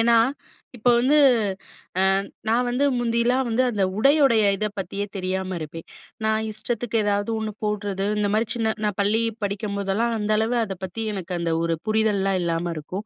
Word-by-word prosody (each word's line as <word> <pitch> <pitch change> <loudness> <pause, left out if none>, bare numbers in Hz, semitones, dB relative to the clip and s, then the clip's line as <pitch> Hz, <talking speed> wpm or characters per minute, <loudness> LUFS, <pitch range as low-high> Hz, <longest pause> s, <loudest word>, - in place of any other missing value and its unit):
ஏன்னா, 235 +1 +4 0.6
இப்போது 240 +1 +3
வந்து, 270 +5 +3 1.1
அ - - -12 0.2
நான் 240 +2 +2
வந்து 250 +4 +1
முந்தில்லாம் 240 +2 +1
வந்து 235 +3 +2
அந்த 205 -3 0 0.2
உடையுடைய 275 -3 +5 0.2
இதை 215 - -1
பத்தியே 195 +2 -3
தெரியாம 185 0 -2
இருப்பேன். 160 +1 -8 0.4
நான் 220 0 +1
இஷ்டத்துக்கு 230 +1 -3
ஏதாவது 205 +1 0
ஒண்ணு 220 0 -3
போட்றது, 205 -2 -2 0.2
இந்தமாரி 210 +2 +1
சின்ன 220 -2 0
நான் 210 -2 -1
பள்ளி 210 +3 +2 0.2
படிக்கும்போதெல்லாம் 200 +2 -1
அந்த 210 0 -1
அளவு 225 +3 +1
அத 195 - -5
பத்தி 205 +5 -5
எனக்கு 185 -2 -6
அந்த 170 -1 0
ஒரு 165 0 +1
புரிதல்லாம் 210 -3 +2
இல்லாம 170 0 -1
இருக்கும். 185 +7 -6
210 Hz, 155 wpm, -24 LUFS, 195-230 Hz, 1.1 s, உடையுடைய